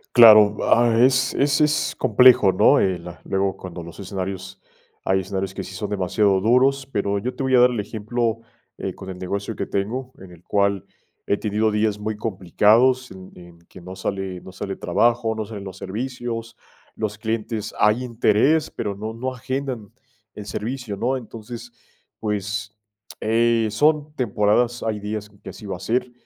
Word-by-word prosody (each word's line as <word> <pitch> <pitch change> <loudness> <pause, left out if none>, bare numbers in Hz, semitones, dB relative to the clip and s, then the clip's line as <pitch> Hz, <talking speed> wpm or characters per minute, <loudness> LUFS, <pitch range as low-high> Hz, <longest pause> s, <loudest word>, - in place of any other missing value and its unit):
Claro, 110 -3 +8
ah, 120 0 +4
es 130 +1 +4
es 140 +1 +2
es 150 0 +1
complejo, 125 -6 +6
¿no? 95 - +5
El 90 -3 0 0.2
luego 95 0 -1
cuando 90 -2 -8
los 85 0 -11
escenarios 95 -1 -6 0.5
hay 95 0 +2
escenarios 95 0 -4
que - - -5
sí - - -9
son 105 -2 -4
demasiado 95 0 +1
duros, 130 +5 +3
pero 100 -2 0
yo 125 +5 -3
te - - -5
voy 130 -1 +2
a - - +6
dar 125 0 +6
el 115 - -3
ejemplo, 115 +2 -2 0.4
eh, - - -4
con 95 - -10
el 95 - -7
negocio 100 +2 -4
que - - -3
tengo, 125 +6 -3
en 95 -1 -12
el 85 0 -16
cual 100 -2 0 0.4
he 100 - +2
tenido 110 +1 0
días 105 0 0
muy 105 0 -4
complicados 115 +6 +2
en 95 0 -11
en 85 -1 -14
que - - -13
no 90 +1 -9
sale 95 -2 -4
no 95 - -11
sale 95 +1 -5
trabajo, 120 -1 +1
no 110 -1 -4
salen 105 -2 -8
los 95 -1 -8
servicios, 115 +2 -5 0.4
los 105 -2 -3
clientes 110 -1 -3
hay 105 +4 +3
interés, 125 +6 +2
pero 100 -3 -4
no 110 +2 -5
no 130 +3 -4
agendan 130 -4 -5 0.4
el 105 - -8
servicio, 115 -1 -4
¿no? 130 +6 0
Entonces, 120 0 -8 0.5
pues, 105 0 -3 0.5
eh, 115 0 +2
son 150 +5 +2
temporadas, 120 0 +1
hay 110 -2 -2
días 105 0 -5
que 100 -1 -11
así 110 - -12
va 95 -2 -4
a - - -17
ser. 125 +5 -1
110 Hz, 175 wpm, -22 LUFS, 100-120 Hz, 0.5 s, Claro